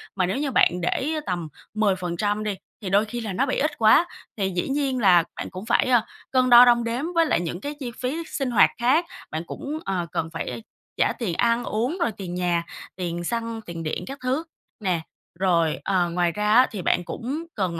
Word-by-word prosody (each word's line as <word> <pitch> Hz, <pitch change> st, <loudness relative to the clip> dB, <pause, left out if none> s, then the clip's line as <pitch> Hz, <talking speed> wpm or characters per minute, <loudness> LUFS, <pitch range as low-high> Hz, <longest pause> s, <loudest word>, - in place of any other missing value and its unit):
mà 185 Hz, -2 st, +2 dB
nếu 190 Hz, +7 st, -1 dB
như 285 Hz, -1 st, -1 dB
bạn 180 Hz, -7 st, +3 dB
để 270 Hz, -, 0 dB
tầm 175 Hz, -3 st, -2 dB, 0.3 s
10% 205 Hz, 0 st, 0 dB
đi 210 Hz, -2 st, -2 dB, 0.3 s
thì 195 Hz, -, -4 dB
đôi 200 Hz, +3 st, +3 dB
khi 235 Hz, +3 st, -5 dB
là 215 Hz, -4 st, -4 dB
nó 260 Hz, -, +1 dB
bị 260 Hz, -, -1 dB
ít 305 Hz, -, 0 dB
quá. 225 Hz, +10 st, +5 dB, 0.3 s
Thì 195 Hz, -2 st, 0 dB
dĩ 180 Hz, -1 st, -2 dB
nhiên 270 Hz, -2 st, 0 dB
là 180 Hz, -6 st, +6 dB
bạn -, -, -5 dB
cũng 185 Hz, +3 st, -8 dB
phải, 235 Hz, -, +3 dB
à, 240 Hz, -3 st, +4 dB, 0.3 s
cân 255 Hz, -1 st, +3 dB
đo 240 Hz, 0 st, +10 dB
đong 240 Hz, -1 st, +4 dB
đếm 230 Hz, +2 st, -2 dB
với 330 Hz, 0 st, +5 dB
lại 305 Hz, -, +2 dB
những 175 Hz, +1 st, -4 dB
cái 290 Hz, -, -4 dB
chi 250 Hz, -4 st, -4 dB
phí 280 Hz, +7 st, -2 dB
sinh 270 Hz, -3 st, -2 dB
hoạt 230 Hz, -, +6 dB
khác. 265 Hz, +8 st, +3 dB, 0.3 s
Bạn 155 Hz, +1 st, -3 dB
cũng, 295 Hz, +2 st, -5 dB
ờ, 185 Hz, -3 st, -1 dB
cần 160 Hz, -, -2 dB
phải 190 Hz, +6 st, -5 dB, 0.3 s
trả -, -, +2 dB
tiền 215 Hz, -8 st, -1 dB
ăn 235 Hz, +2 st, +2 dB
uống, 245 Hz, +11 st, -1 dB
rồi 235 Hz, -, +2 dB
tiền 180 Hz, -3 st, -5 dB
nhà, 175 Hz, -1 st, 0 dB, 0.3 s
tiền 175 Hz, -2 st, -3 dB
xăng, 230 Hz, +3 st, -3 dB
tiền 170 Hz, -5 st, -7 dB
điện 155 Hz, -, -3 dB
các 275 Hz, +2 st, -7 dB
thứ 260 Hz, +5 st, 0 dB, 0.4 s
nè. 185 Hz, -6 st, 0 dB, 0.4 s
Rồi, 170 Hz, -4 st, +2 dB
ờ, 180 Hz, -3 st, +1 dB
ngoài 175 Hz, 0 st, +1 dB
ra 210 Hz, +3 st, +1 dB
á 250 Hz, +3 st, +7 dB
thì 200 Hz, -4 st, -5 dB
bạn 175 Hz, -, +1 dB
cũng 270 Hz, -, -4 dB
cần 180 Hz, -4 st, -1 dB
215 Hz, 220 wpm, -24 LUFS, 180-250 Hz, 0.4 s, đo